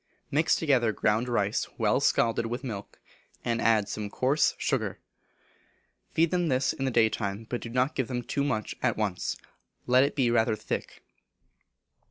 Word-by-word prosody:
Mix 155 +3 +3
together 130 -8 +2
ground 110 +3 0
rice 105 -4 0
well - - +2
scalded 115 0 +2
with 120 +4 -4
milk, 105 -6 -7 0.5
and 115 -1 0
add 110 -3 +3
some 105 -1 -4
coarse 135 +8 +2
sugar. - - -1 1.1
Feed 165 0 +2
them 180 -1 +1
with - - 0
this 130 0 +1
in 135 - -3
the - - +1
daytime, 110 -3 0
but 120 - -2
do 115 - -6
not 125 +5 +1
give 130 -4 -1
them 125 -2 -3
too 140 - -1
much 110 -7 -1
at - - +1
once; 105 -4 -2 0.5
let 125 +1 +5
it 140 - -1
be 130 -5 +2
rather 110 -2 +2
thick. 110 - -5
120 Hz, 170 wpm, -28 LUFS, 110-135 Hz, 1.1 s, let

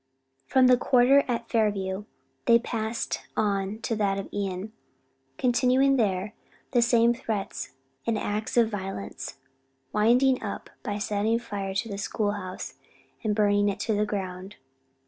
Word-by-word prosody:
From 260 -1 +5
the 250 0 +6
quarter 260 +3 +5
at 235 -2 -2
Fairview, 205 -3 0 0.4
they 235 -1 +8
passed 230 -1 -3 0.2
on 200 -1 0
to 225 - -1
that 200 -2 +1
of 195 - -5
Ion, 200 +1 -3 0.6
continuing 255 +2 +3
there 200 -2 0 0.4
the 245 - +4
same 235 0 +4
threats 220 - -4 0.3
and 230 -1 +1
acts 210 +3 -2
of 235 -2 +6
violence; 190 - -5 0.6
winding 250 +5 +4
up 205 - -6
by 205 -1 -3
setting 210 +2 +1
fire 200 -4 -4
to 210 +4 0
the 200 -2 -5
school 205 +1 -1
house, 185 -3 -6 0.4
and 210 -2 +1
burning 205 -1 +3
it 200 - -3
to 225 - 0
the 210 0 +1
ground. 190 -1 -5
210 Hz, 145 wpm, -27 LUFS, 200-235 Hz, 0.6 s, they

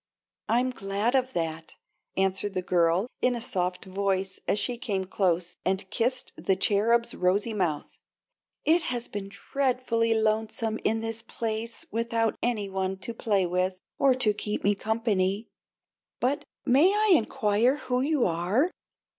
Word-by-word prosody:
"I'm 245 +3 +2
glad 200 +1 -1
of 260 -1 +1
that," 165 -1 -3 0.4
answered 195 +1 0
the 185 - -1
girl, 175 +2 +2 0.2
in 250 -1 +3
a - - -3
soft 180 -6 -2
voice, 190 0 -1
as - - +2
she 245 +3 -1
came 195 -5 -1
close 180 -2 0
and 190 +1 -1
kissed 250 +3 0
the 190 - +1
Cherub's 220 +5 +2
rosy 200 +5 +1
mouth. 175 -8 -2 0.7
"It 335 +3 +5
has 245 -5 0
been 200 -1 -6
dreadfully 230 0 0
lonesome 220 0 0
in 225 +1 +1
this 225 0 -3
place 225 0 -4
without 230 0 0
any 225 -4 0
one 190 0 -2
to 190 +5 -6
play 205 -4 +1
with 185 +1 -1 0.2
or 270 -2 +5
to 235 -5 +2
keep 210 0 -3
me 205 - +4
company. 215 -1 0 0.7
But 285 +4 0 0.2
may 280 +9 +5
I 420 0 +3
inquire 225 -2 +2
who 255 -2 -1
you 290 -1 +2
are?" 185 - +1
215 Hz, 145 wpm, -27 LUFS, 190-240 Hz, 0.7 s, It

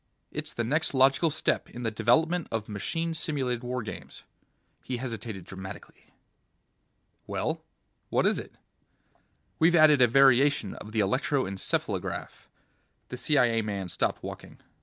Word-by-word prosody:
It's - - -3
the 120 - -2
next 145 +5 0
logical 135 +5 +4
step 155 - -1
in 125 - -8
the 115 - 0
development 160 +11 +2
of 110 -2 -3
machine 165 - -3
simulated 135 -7 -2
war 125 0 -3
games." 110 - -9 0.6
He 125 - -3
hesitated 115 -6 -6
dramatically. 95 +1 -10 1.2
"Well, - - -2 0.5
what - - +2
is - - +2
it?" - - -10 1.0
"We've 165 +2 +5
added 155 -4 +6
a 125 - +7
variation 135 -3 +4
of 105 - -10
the 110 -1 +1
electro 130 +7 +1
encephalograph 95 0 -3 0.3
..." - - -44
The 125 - -6
CIA 125 -4 +3
man 100 -4 -4
stopped - - 0
walking. - - -8
125 Hz, 140 wpm, -28 LUFS, 110-145 Hz, 1.2 s, a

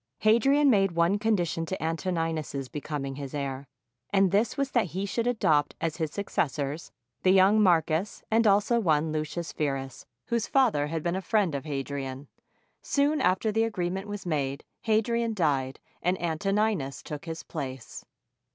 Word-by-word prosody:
Hadrian 270 +6 +4
made 195 -4 +3
one 170 +4 +2
condition 190 -7 0
to 190 - -3
Antoninus's 160 -4 -2
becoming 140 -2 -4
his 140 -1 -6
heir, 140 -1 -4 0.4
and 195 -2 +3
this 210 +8 +1
was 275 -1 -1
that 240 -5 +2
he 195 - -1
should 230 +4 -1
adopt 155 -12 +2
as 165 -1 -2
his 160 -3 -1
successors 150 -4 -2 0.3
the 185 - +3
young 195 +3 +5
Marcus 170 0 +2
and 225 0 +4
also 210 +4 +3
one 160 -6 +2
Lucius 155 +2 -3
Verus, 135 -3 -3 0.2
whose 235 -1 -1
father 225 - +3
had 160 0 -3
been 175 +1 0
a 190 - -2
friend 195 -2 +1
of 140 +1 -4
Hadrian. 135 -1 -4 0.5
Soon 290 +2 +1
after 185 +4 +2
the 225 +1 +2
agreement 190 -2 -2
was 205 -2 -6
made, 140 -4 -2 0.2
Ha 220 - +2
drian 230 0 -1
died, 140 -7 0 0.2
and 180 +1 0
Antoninus 175 - -1
took 150 0 -7
his 165 -1 -6
place. 130 -6 -6
170 Hz, 160 wpm, -28 LUFS, 150-210 Hz, 0.5 s, young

